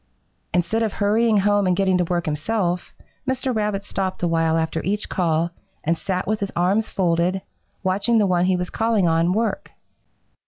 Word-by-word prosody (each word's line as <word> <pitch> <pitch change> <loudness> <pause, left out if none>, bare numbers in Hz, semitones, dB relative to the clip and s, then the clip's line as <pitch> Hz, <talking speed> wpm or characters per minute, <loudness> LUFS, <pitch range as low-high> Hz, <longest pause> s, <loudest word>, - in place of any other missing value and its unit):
"Instead 180 +6 +1
of 220 -3 0
hurrying 215 +2 +2
home 205 0 +3
and 180 - +3
getting 190 -1 +2
to - - +3
work 175 0 -1
himself, 175 +3 -1 0.4
Mr. 260 -1 -1
Rabbit 210 -2 -1
stopped 190 -2 -3
a - - +3
while 165 -1 +2
after 160 0 -1
each 205 +3 -2
call 170 -2 0 0.3
and 165 +2 +1
sat 185 +1 -2
with 215 +2 -1
his 200 -1 -3
arms 195 +6 +1
folded, 180 +1 +1 0.4
watching 200 +5 +1
the 210 - +4
one 180 -2 +2
he 185 0 +2
was 180 0 -4
calling 225 -5 +1
on 165 +1 +2
work. 225 +4 -1
190 Hz, 180 wpm, -22 LUFS, 175-210 Hz, 0.4 s, the